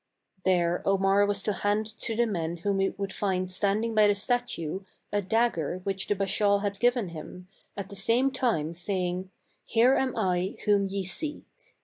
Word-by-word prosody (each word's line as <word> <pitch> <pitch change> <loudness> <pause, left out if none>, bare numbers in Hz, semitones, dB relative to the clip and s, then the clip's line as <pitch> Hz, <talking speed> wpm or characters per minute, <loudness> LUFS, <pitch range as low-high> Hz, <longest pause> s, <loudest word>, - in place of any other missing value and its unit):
There 175 -2 +2
Omar 195 +1 +3
was 200 -1 +1
to 210 - 0
hand 205 +2 0
to 225 - -2
the 240 +2 +3
men 170 -6 -2
whom 195 +3 -1
he 195 - +2
would 195 -1 -5
find 185 -2 -1
standing 205 +4 0
by 215 -1 +5
the 205 - +3
statue 205 -7 -1 0.3
a 205 - +1
dagger 190 -5 0
which 195 -1 -2
the 205 - +1
Bashaw 200 +1 +2
had 200 -1 -2
given 240 -4 +2
him, 180 +2 -9 0.3
at 200 -1 -5
the 200 - -9
same 235 +7 +2
time 220 - 0
saying, 180 +1 -2 0.2
" - - -40
Here 240 +3 +4
am 265 -1 0
I 185 +1 0
ye 200 -1 +2
seek." 300 - -4
200 Hz, 175 wpm, -28 LUFS, 185-215 Hz, 0.3 s, by